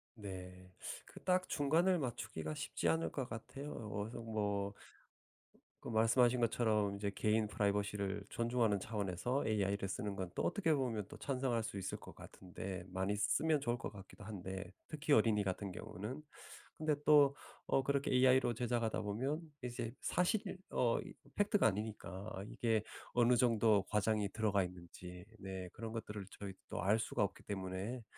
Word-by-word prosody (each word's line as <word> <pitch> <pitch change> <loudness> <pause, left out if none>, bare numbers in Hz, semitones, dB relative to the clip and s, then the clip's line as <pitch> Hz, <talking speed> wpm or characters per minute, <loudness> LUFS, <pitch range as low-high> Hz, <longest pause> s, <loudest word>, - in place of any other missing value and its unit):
네. 90 -3 -8 0.3
그 - - -13
딱 185 0 +3
중간을 165 +6 +3
맞추기가 110 - -3
쉽지 85 - -2
않을 80 0 +1
것 130 - -2
같아요. 135 +6 -6
어 105 -2 -4
어서 115 - -6
뭐 105 -3 -1 1.1
그 - - -6
말씀하신 120 +2 +4
것처럼 110 -3 +2
이제 100 0 -2
개인 110 +2 +2
프라이버시를 100 -1 0
존중하는 115 -3 +2
차원에서 105 +5 -1
AI를 100 -2 +1
쓰는 100 +1 -3
건 95 -1 -2
또 - - 0
어떻게 165 -7 +2
보면 120 -7 0
또 - - -10
찬성할 130 -4 0
수 110 -2 -4
있을 95 -1 -3
것 - - -11
같은데 95 0 -7
많이 95 +2 -1
쓰면 150 +8 +2
좋을 120 -2 0
것 - - -5
같기도 100 0 -11
한데, 95 -2 -6
특히 150 -1 0
어린이 110 -3 +5
같은 95 +1 -2
경우는. 105 +11 -6 0.5
근데 155 -1 +2
또 145 -2 +7 0.3
어 135 - +4
그렇게 140 +1 +1
AI로 130 -1 +5
제작하다 120 -1 0
보면 125 +9 -1 0.2
이제 120 -2 -3
사실 190 +2 +1
어 120 -2 +3 0.4
팩트가 205 0 +3
아니니까 105 -1 -2
아 95 - -5
이게 110 -1 +1 0.3
어느 120 0 +5
정도 110 -4 +5
과장이 105 0 +2
들어가 105 -3 +2
있는지 90 0 -8 0.2
네 95 -2 -5
그런 115 -1 -5
것들을 105 -3 -5
저희 100 -1 -5 0.2
또 - - -4
알 105 +5 +4
수가 105 - +1
없기 100 - -4
때문에 100 +5 -4
110 Hz, 330 characters per minute, -37 LUFS, 100-125 Hz, 1.1 s, 또